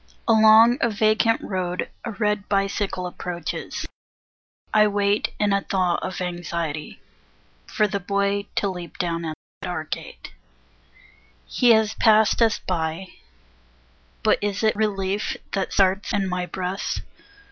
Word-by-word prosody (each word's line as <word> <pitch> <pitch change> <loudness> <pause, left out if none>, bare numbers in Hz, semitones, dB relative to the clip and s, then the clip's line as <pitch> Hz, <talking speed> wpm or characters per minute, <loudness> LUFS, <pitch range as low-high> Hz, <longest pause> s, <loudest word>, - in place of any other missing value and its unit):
Along 220 +2 +7
the 235 - +2
vacant 215 +2 +2
road, 180 -2 -3 0.2
a 235 - -4
red 210 -1 -1
Bicycle 195 -2 -1
approaches; 175 -1 -5 0.9
I 215 -1 +6
wait 205 0 +1
In 205 -1 +2
a 200 - +2
thaw 185 -3 0
of 185 0 -4
anxiety, 170 -4 -4 0.7
for 215 -2 +1
the 200 0 -2
boy 200 +1 -1
To 200 - +1
leap 180 -3 -6
down 170 -1 -2
at 155 -1 -4 0.3
our 180 -4 -3
gate. 155 - -7 1.1
He 245 - +2
has 220 -1 +2
passed 220 0 +4
us 225 -2 +4
by; 170 +1 -3 1.1
but - - +3
is 205 +1 -2
it 215 - +3
Relief 200 -1 -1
that 195 -2 -2
starts 195 +1 +2
in 195 -2 +1
my 180 -1 -2
breast? 185 +2 -3
200 Hz, 130 wpm, -23 LUFS, 180-210 Hz, 1.1 s, Along